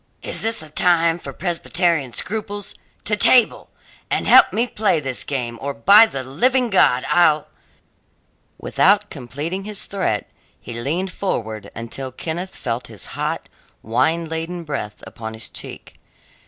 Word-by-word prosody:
"Is - - 0
this 225 -6 +2
a 155 - -11
time 170 +1 +2
for 140 - -8
Presbyterian 170 -3 -1
scruples? 205 - -4 0.3
To 210 - +2
table, 235 +2 +4 0.4
and - - 0
help - - +8
a - - -7
me 230 +3 +2
play 210 -8 +1
this 135 -4 -1
game, 120 -4 -4
or, 140 0 -4
by 200 - +7
the 135 -9 -5
living 245 - +1
God, 130 -9 +4
I'll 155 -4 +3 0.6
" - - -43 0.3
Without 205 +2 +2
completing 145 +8 -5
his 210 -1 -5
threat 150 - -2 0.3
he - - -9
leaned 155 +11 -2
forward 110 - -4
until 115 +4 -6
Kenneth 170 +7 -5
felt 125 -1 -4
his 110 -4 -7
hot, - - -3 0.4
wine 160 +9 0
laden 165 +2 -5
breath 140 -9 -6
upon 110 -1 -8
his 110 - -4
cheek. - - -10
160 Hz, 150 wpm, -20 LUFS, 125-195 Hz, 0.6 s, help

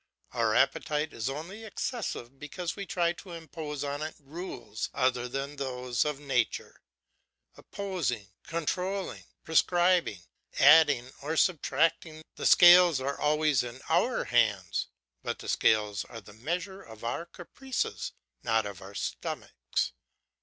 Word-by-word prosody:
Our - - +1
appetite 150 +1 +1
is 115 +3 -2
only 170 +10 -6
excessive 200 - -4
because 165 +4 -5
we 200 -1 -6
try 170 -1 +1
to 175 +1 -11
impose 160 -3 -6
on 145 +1 -3
it 155 +1 -4
rules 145 - -6
other 125 -1 +1
than 135 +3 -4
those 125 -2 -1
of 150 -2 -2
nature, 135 -6 -1 0.7
opposing, 170 - -3
controlling, 180 +4 -3 0.2
prescribing, 175 - +2 0.3
adding, 145 -4 +6
or 155 +3 -2
substracting; 165 -2 +1
the - - 0
scales 175 -4 +8
are 140 +2 -3
always 150 -2 +3
in 120 +1 -7
our - - +2
hands, - - +1 0.3
but - - -3
the - - -10
scales 105 -2 +2
are 115 - -9
the 105 -1 -14
measure 175 - -4
of 110 - -13
our 145 +9 -3
caprices 250 +10 -4 0.3
not 110 -1 +1
of 100 -3 -7
our 100 +1 -11
stomachs. 65 -9 -3
150 Hz, 130 wpm, -29 LUFS, 125-175 Hz, 0.7 s, scales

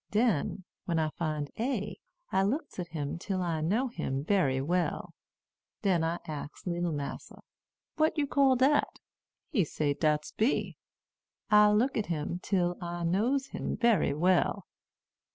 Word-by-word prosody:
Den, 205 - +1 0.2
when 170 -2 0
I 155 -1 +1
find 155 -3 -3
A, 230 -4 -2 0.3
I 190 - +3
looks 255 - -2
at 175 - -3
him 155 -1 -4
till 185 0 -2
I 165 -3 -1
knows 230 +10 0
him 135 +1 -2
bery 150 -8 +2
well. 175 +6 -1 0.7
Den 180 -5 +2
I 165 +1 0
ax 150 -1 -7
leetle 175 -1 -1
massa, 145 -2 -6 0.6
'What 315 +1 +2
you 295 - +2
call 275 -2 +4
dat?' 270 +4 +2 0.5
He 215 - +3
say 145 -1 -1
dat's 150 0 0
B. 225 +6 0 0.8
I 210 0 +7
looks 225 +5 +2
at 215 - -2
him 170 +1 -2
till 180 -2 0
I 175 0 -4
knows 235 +11 +1
him - - -3
bery 230 -11 +3
well. 180 +4 +2
180 Hz, 150 wpm, -30 LUFS, 155-220 Hz, 0.8 s, I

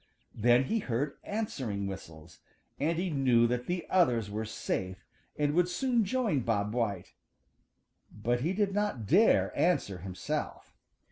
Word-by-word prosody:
Then 120 +3 +4
he 225 +12 0
heard 140 - -2
answering 130 - -3
whistles, 80 -4 -9 0.4
and 160 +3 0
he 180 0 -1
knew 130 -5 +4
that 125 +1 -1
the 175 -1 -2
others 120 - +2
were 110 +2 -3
safe 95 -3 -4 0.3
and 145 0 +1
would 175 +2 +3
soon 235 +4 +1
join 225 - +1
Bob 105 -3 -1
White. 105 -7 -2 1.0
But 120 +3 -1
he 165 +7 0
did 200 0 0
not 205 - -1
dare 195 - +4
answer 130 - +1
himself. 90 +1 -5
125 Hz, 140 wpm, -30 LUFS, -, 1.0 s, Then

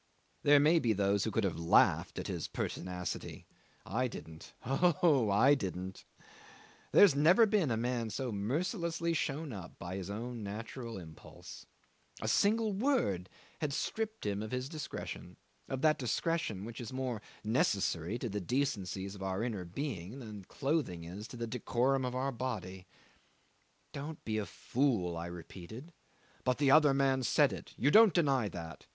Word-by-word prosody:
'There 145 0 +6
may 155 +4 +5
be 115 -7 +2
those 100 0 +1
who - - 0
could 110 +1 0
have 95 -4 -1
laughed 85 0 +3
at - - -3
his - - -3
pertinacity; 90 -1 -4 0.4
I 125 +6 0
didn't. 80 -8 -10
Oh, 145 - +3
I 115 +8 +6
didn't! 95 -6 -4 0.9
There - - +9
had 170 -9 +3
never 175 +10 +6
been 205 -8 +2
a 115 - +1
man 120 -1 -1
so 125 +4 -3
mercilessly 170 - -1
shown 150 -2 -2
up 95 -4 -9
by 90 +2 -5
his 95 -1 -5
own 115 +3 -5
natural 115 +3 -6
impulse. 80 -4 -11 0.5
A - - -3
single 215 +1 +3
word 195 - +1 0.3
had 150 -3 -1
stripped 220 - -3
him 100 0 -1
of 110 - -5
his 125 +2 -2
discretion 155 -3 -6 0.3
of 135 0 -3
that 155 -1 +4
discretion 125 - -1
which 115 +1 -7
is 115 - -6
more 130 -4 -3 0.2
necessary 105 -4 +1
to 120 - -3
the 105 -1 -3
decencies 100 -5 -1
of 100 - -10
our 95 +2 -1
inner 105 -7 -3
being 105 - -5
than 105 -7 -8
clothing 135 - -1
is 95 +6 -7
to 125 - -9
the 115 - -2
decorum 125 +3 0
of 125 0 -3
our 135 +2 0
body. 110 -8 -5 1.1
"Don't 145 +2 -7
be 110 -1 0
a 105 - -3
fool," 115 -10 0
I 85 +1 -4
repeated. 90 - -9 0.5
"But 125 -1 +1
the 140 -2 +3
other 150 -1 +7
man 135 -1 +2
said 120 - +3
it, - - -9
you 140 +5 +3
don't 220 0 +7
deny 135 - +2
that?" 85 -3 -8
120 Hz, 165 wpm, -33 LUFS, 100-145 Hz, 1.1 s, There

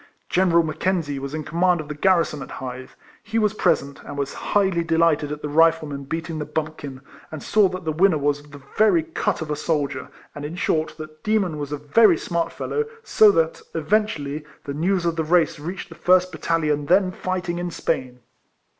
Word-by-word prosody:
General 175 -2 +3
Mackenzie 155 -2 -1
was 140 +2 -5
in 155 - -3
com 165 +3 -5
mand 180 -1 +4
of 155 - -6
the 150 - -4
garrison 165 -2 +2
at - - -8
Hythe. 130 0 -7 0.3
He 225 +2 -3
was 215 -2 +2
present, 140 -9 0
and 145 - -8
was 140 -1 -2
highly 190 -4 +1
delighted 165 -3 +2
at 150 0 -6
the - - -1
Rifleman 155 -2 +2
beating 160 +2 -4
the 150 - -3
bumpkin, 150 -3 -5 0.3
and 155 -2 -7
saw 205 -2 +4
that 185 -1 -6
the 160 - 0
winner 175 +1 +3
Avas 145 0 -1
the 145 - -11 0.2
very 205 -7 +4
cut 160 0 -2
of 150 - -6
a - - 0
soldier, 145 -3 -2 0.3
and 145 - -8
in 150 +3 -5
short 155 -3 -1
that 155 -1 -10
Demon 200 -8 0
was 145 -1 -5
a 150 - -2
very 165 +6 +4
smart 170 +1 -2
fellow, 445 0 -2 0.2
so 215 - +6
that, 165 -4 +1
eventually, 160 -4 0 0.2
the 140 - -5
news 175 +4 0
of 170 -1 0
the 160 - +1
race 165 -1 +2
reached 180 +6 -6
the - - -10
first 180 +2 +3
battalion 150 -3 -1
then 185 +1 +4
fighting 180 -2 -3
in 175 0 -3
Spain. 130 -7 -3
160 Hz, 200 wpm, -23 LUFS, 150-180 Hz, 0.3 s, so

